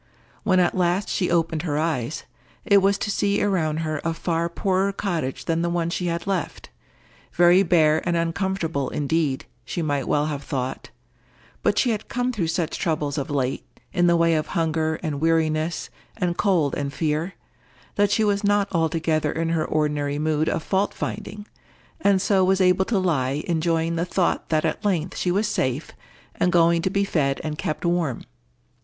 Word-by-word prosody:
When 185 -3 +3
at 180 - +2
last 180 +2 +1
she 180 - 0
opened 165 -2 +1
her 150 -4 -2
eyes, 150 -3 -1 0.4
it 200 -1 +6
was 195 +1 +3
to 205 - -2
see 200 0 +1
around 160 -6 0
her 155 -2 -2
a 165 0 -1
far 170 0 -1
poorer 190 +2 0
cottage 170 -9 -3
than 165 0 0
the 170 - 0
one 170 -1 -1
she 180 0 -2
had 170 0 -2
left—very 175 - 0
bare 160 -4 +3
and 170 - +1
uncomfortable 165 -4 -1
indeed, 145 -2 -1 0.2
she 165 +7 -3
might 145 -4 -1
well 150 0 +2
have 145 -2 -3
thought; 130 -2 -4 0.7
but - - +1
she 245 - +3
had 215 -1 -3
come 245 0 -1
through 185 -8 -1
such 165 0 -2
troubles 150 -3 -1
of 140 - -4
late, 135 -2 -1 0.3
in 175 -2 +3
the 170 - +4
way 165 0 +3
of 155 -1 0
hunger 160 -1 0
and 150 -3 -3
weariness 160 0 0 0.3
and 180 -4 0
cold 170 -9 +2
and 140 -1 -3
fear, 160 +4 -1 0.6
that 205 0 +2
she 220 - +2
was 205 0 +1
not 205 -1 +2
altogether 160 -2 0
in 165 0 -2
her 165 -1 0
ordinary 150 -2 -1
mood 155 +1 +1
of 155 - -2
fault 195 +1 0
finding, 205 0 -5 0.5
and 200 -10 +3
so 195 -2 +3
was 190 +1 +3
able 185 0 +3
to 220 - 0
lie 150 -6 0
enjoying 165 0 0
the 170 - 0
thought 180 0 0
that 155 0 +1
at 160 - -2
length 180 -4 0
she 180 - -1
was 200 +4 +1
safe, 130 -7 -1 0.4
and 180 - +1
going 170 0 +4
to 190 - 0
be 200 +1 +1
fed 140 -8 0
and 150 -1 -4
kept 155 - -3
warm. 170 -7 0
165 Hz, 180 wpm, -23 LUFS, 155-185 Hz, 0.7 s, it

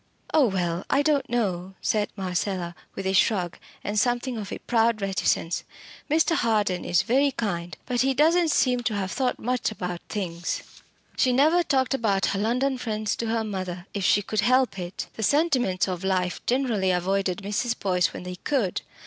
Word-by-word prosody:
"Oh! 300 -5 +5
well 175 -3 -1
I 280 - +3
don't 290 -2 +1
know," 190 -6 -1
said 210 -1 0
Marcella, 185 -2 -2 0.2
with 195 - -5
a 190 - +1
shrug, 185 -3 +2 0.2
and 205 +1 0
something 245 +2 0
of 210 -3 -6
a - - -3
proud 230 -1 +1
reticence. 190 -3 0 0.5
"Mr. 320 +3 +3
Harden 210 - +1
is 175 - +2
very 270 +5 +3
kind 175 - -3
but 245 -1 0
he 265 0 +2
doesn't 325 +4 +4
seem 255 -4 +2
to 235 -3 -1
have 190 -2 -2
thought 255 -2 0
much 250 +1 -1
about 180 -5 -5
things." 175 -5 -3 0.5
She 255 - +3
never 305 +7 +4
talked 265 -5 +1
about 210 -7 +1
her 195 - -1
London 255 +5 0
friends 215 -3 -2
to 230 - -2
her 225 0 0
mother, 185 -4 -4
if 200 - -3
she 205 +3 +3
could 215 +2 -2
help 250 -3 +2
it. 180 +1 -5
The - - -7
sentiments 250 - +2
of 185 -1 -4
life 185 -1 0
generally 240 -7 +1
avoided 190 +1 0
Mrs. 225 +4 -1
Boyce 180 -3 +1
when - - -8
they 180 0 -6
could. 230 -6 -1
210 Hz, 180 wpm, -25 LUFS, 185-250 Hz, 0.5 s, Oh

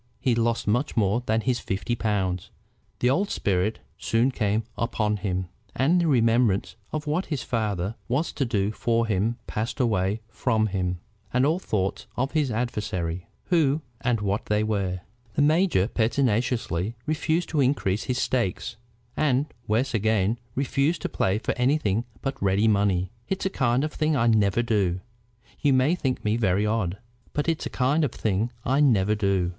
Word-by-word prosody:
he 125 0 +2
lost 115 0 +1
much 120 +6 0
more 105 +2 +2
than 110 +1 +2
his 125 0 0
fifty 105 +3 -2
pounds. 95 -6 -1 0.5
The 125 - +4
old 195 +8 +1
spirit 100 +2 0 0.2
soon 115 +4 +2
came 105 -2 0
upon 105 -2 0
him, 95 -2 -2 0.3
and 160 +8 +3
the 170 - +1
remembrance 115 -6 +2 0.2
of 155 0 -3
what 155 +5 -1
his 150 -5 -2
father 105 -4 -1
was 140 +7 0
to 140 - -1
do 105 -5 0
for 115 +1 +1
him 110 +2 0
passed 115 +5 -3
away 105 -3 +1
from 110 -1 0
him, 90 -3 -1 0.3
and 125 +2 +3
all 160 +5 +2
thoughts 95 - -2
of 130 +3 0
his 150 -4 +1
adversaries, 105 -7 -2 0.3
who 155 -4 +3 0.2
and 120 -3 +1
what 100 0 -1
they 105 0 +2
were. 100 -4 -1 0.3
The 145 - +3
major 155 - +3
pertinaciously 115 - 0
refused 160 +2 0
to 150 -3 +1
increase 120 -7 +1
his 125 - -1
stakes, 115 -3 -1 0.4
and, 140 -1 +1
worse 120 +6 +1
again, 110 0 +1 0.2
refused 140 +4 0
to - - -1
play 95 +2 +1
for 110 - -2
anything 125 -5 +2 0.2
but 135 0 -3
ready 100 +3 +3
money. 100 -3 +2 0.2
"It's 190 0 -2
a 190 - +1
kind 125 -2 +1
of 155 - -2
thing 155 0 +1
I 115 -4 +2
never 110 -1 +3
do. 100 -6 +1 0.6
You 145 -2 +3
may 130 +5 +4
think 135 -10 -2
me 105 +2 +2
very 100 -2 +2
odd, 105 -4 0 0.4
but 145 - -1
it's 165 -1 0
a - - -10
kind 150 +5 +3
of 140 - +1
thing 110 +3 -1
I 135 +3 +2
never 105 -8 +4
do." 100 -4 +1
115 Hz, 170 wpm, -25 LUFS, 100-135 Hz, 0.6 s, The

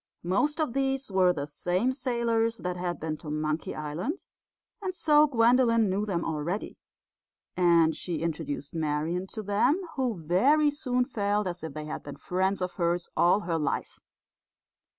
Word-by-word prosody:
Most 290 - +1
of 305 -7 0
these 270 -3 0
were 185 -1 +4
the 145 -5 -3
same 180 - 0
sailors 235 -3 0
that 180 -3 -3
had 175 -1 -3
been 155 -1 -3
to 150 - -9
Monkey 155 +1 -2
Island, 160 - -4 0.6
and 370 -2 -3
so 300 -2 +5
Gwendolen 230 -4 +4
knew 205 +3 -1
them 175 -4 -1
already; 165 +6 -3 0.8
and 170 -3 +4
she 170 -3 -3
introduced 145 -3 -3
Marian 160 +3 -1
to 215 +2 -6
them, 205 - +2 0.2
who 255 -4 0
very 270 - +3
soon 250 -4 0
felt 210 -4 0
as 180 -2 -4
if 160 -3 -6
they 155 0 -5
had 155 - -5
been 145 - -9
friends 190 +1 -1
of 180 - -4
hers 175 0 0
all 180 +4 +4
her 170 -4 -1
life. 150 - -2
185 Hz, 160 wpm, -28 LUFS, 165-245 Hz, 0.8 s, so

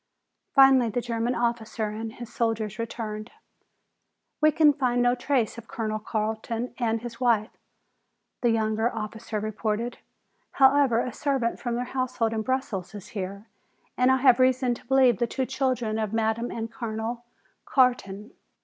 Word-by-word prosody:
Finally 270 -3 +6
the 235 - -1
German 235 0 -1
officer 235 -2 -1
and 220 +1 -5
his 240 -1 -10
soldiers 225 -2 -1
returned. 220 -1 -5 1.1
"We 310 0 +6
can 300 -1 +5
find 250 -3 0
no 245 0 +4
trace 245 -3 0
of 225 - -14
Colonel 215 -2 -3
Carton 220 +2 -3
or 230 -2 +1
his 230 0 -8
wife," 230 -3 +2 0.9
the 240 - +3
younger 220 0 +1
officer 220 0 -4
reported. 215 +2 -3 0.5
"However, 270 -3 +4
a 250 - -4
servant 270 -4 -1
from 240 -1 -2
their 245 - -1
household 250 -3 -1
in 220 - -1
Brussels 220 -6 -3
is 200 - -9
here 200 0 -5 0.5
and 250 +1 +4
I 260 - +4
have 255 -2 +5
reason 255 -1 +3
to - - -11
believe 260 -5 +4
the 240 - +1
two 260 +2 -2
children 255 -4 -1
of 215 -1 -2
Madame 225 +1 0
and 225 0 -5
Colonel 230 +1 -4 0.4
Carton." 235 -5 +1
235 Hz, 150 wpm, -26 LUFS, 220-250 Hz, 1.1 s, Finally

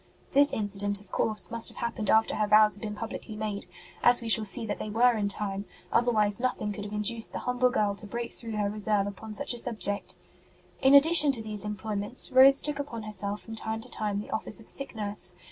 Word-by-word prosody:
This 285 +1 +4
incident, 205 -1 -1
of 200 -2 -20
course, 215 +1 -2
must 230 -1 +1
have - - -12
happened 230 -3 -3
after 220 0 +2
her 215 - 0
vows 215 0 +5
had 205 - -5
been 210 -1 -5
publicly 220 0 -7
made, 210 -2 -5 0.3
as 240 0 +5
we 230 - -6
shall 220 0 +5
see 225 +3 +3
that 210 - -4
they 215 - -5
were 240 +3 +3
in 205 -2 -1
time; 200 -1 -2 0.3
otherwise 215 -4 +2
nothing 245 -4 -2
could 205 0 -7
have 205 - -8
induced 220 +2 0
the - - -4
humble 250 0 0
girl 210 -5 0
to 200 +1 -10
break 235 +2 -5
through 230 -2 -7
her 205 -1 0
reserve 210 -1 0
upon 210 +2 -8
such 285 0 +1
a 240 - +3
subject. 215 -4 -2 0.6
In 270 +1 +5
addition 300 0 +7
to 235 - +2
these 210 -2 -4
employments, 210 +2 -3
Rose 270 +2 +6
took 295 -1 0
upon 235 -6 -6
herself 205 -1 -3
from 225 - -10
time 220 0 -4
to 250 - -9
time 210 -3 -2
the 205 - -6
office 220 0 -1
of 225 - -13
sick 275 -3 0
nurse. 205 -4 -1
215 Hz, 225 wpm, -27 LUFS, 205-240 Hz, 0.6 s, addition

